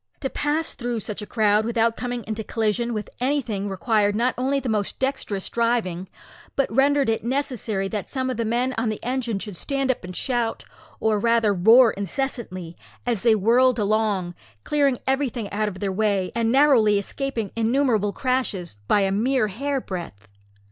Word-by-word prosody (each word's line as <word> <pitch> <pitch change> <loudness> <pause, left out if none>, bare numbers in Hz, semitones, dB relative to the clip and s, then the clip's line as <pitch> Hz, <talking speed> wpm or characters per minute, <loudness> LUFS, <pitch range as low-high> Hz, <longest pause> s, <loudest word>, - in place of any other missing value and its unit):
To 270 - -2
pass 305 +2 -1
through 240 -2 -3
such 210 +1 -5
a 210 - -7
crowd 215 -2 +2
without 230 0 +1
coming 245 -1 -4
into 220 +1 -4
collision 225 +2 -1
with 215 -3 -3
anything 240 -7 -1
required 205 +1 +1
not 240 +3 +1
only 270 +2 0
the 265 - -5
most 210 -3 -1
dexterous 260 -7 -2
driving, 225 -7 -1 0.5
but 275 -5 0
rendered 280 +2 +3
it 225 0 0
necessary 240 -6 -1
that 210 -2 -4
some 260 -1 -1
of 250 - -4
the 230 - 0
men 240 +3 0
on 225 0 0
the 215 - -3
engine 245 -3 -1
should 205 -1 -6
stand 275 - 0
up 260 - -6
and 180 0 -8
shout, 240 -3 -1 0.3
or 215 -1 +1
rather 230 -1 +3
roar 225 +6 +6
incessantly, 200 - -4 0.3
as 235 -5 0
they 230 -2 +4
whirled 240 +4 +4
along, 205 -4 0 0.3
clearing 285 -4 +2
everything 265 -5 -1
out 215 +1 0
of 185 -3 -5
their 200 -2 -1
way, 200 -2 0
and 230 -1 +1
narrowly 255 -7 +5
escaping 230 +1 -3
innumerable 230 -3 +2
crashes 245 - -2
by 205 - +4
a 195 0 +1
mere 225 +2 +1
hairbreadth. 190 - -4
225 Hz, 170 wpm, -23 LUFS, 205-255 Hz, 0.5 s, roar